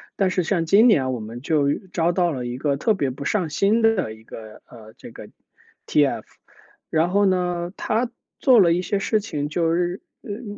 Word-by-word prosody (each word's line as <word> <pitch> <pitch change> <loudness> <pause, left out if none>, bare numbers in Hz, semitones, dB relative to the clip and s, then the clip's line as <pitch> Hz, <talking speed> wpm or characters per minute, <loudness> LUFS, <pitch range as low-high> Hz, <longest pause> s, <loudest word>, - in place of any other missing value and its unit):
但 190 -2 +1
是 185 - 0
像 170 0 -1
今 205 +8 +5
年 130 - +3
我 120 - -4
们 115 +3 -8
就 145 -1 +1 0.2
招 170 0 +1
到 175 -1 +1
了 125 -3 -4
一 120 +1 -5
个 140 0 -1
特 215 +7 +1
别 140 -7 -1
不 140 +2 -8
上 185 -1 0
心 215 +7 +2
的 220 - +2
一 110 - -18
个， 110 -1 -12
呃， 110 -2 -14
这 - - -12
个 - - -11
TF， - - -21 1.6
然 160 +2 +1
后 200 +1 +3
呢 180 -1 -1
他 235 +2 -1 0.3
做 250 -4 +5
了 170 -3 +5
一 180 - 0
些 190 +3 -1
事 215 +2 0
情 150 -9 -4
就 165 +2 0
是， 175 +1 -2 0.2
嗯 205 0 -7
175 Hz, 220 characters per minute, -22 LUFS, 140-200 Hz, 1.6 s, 今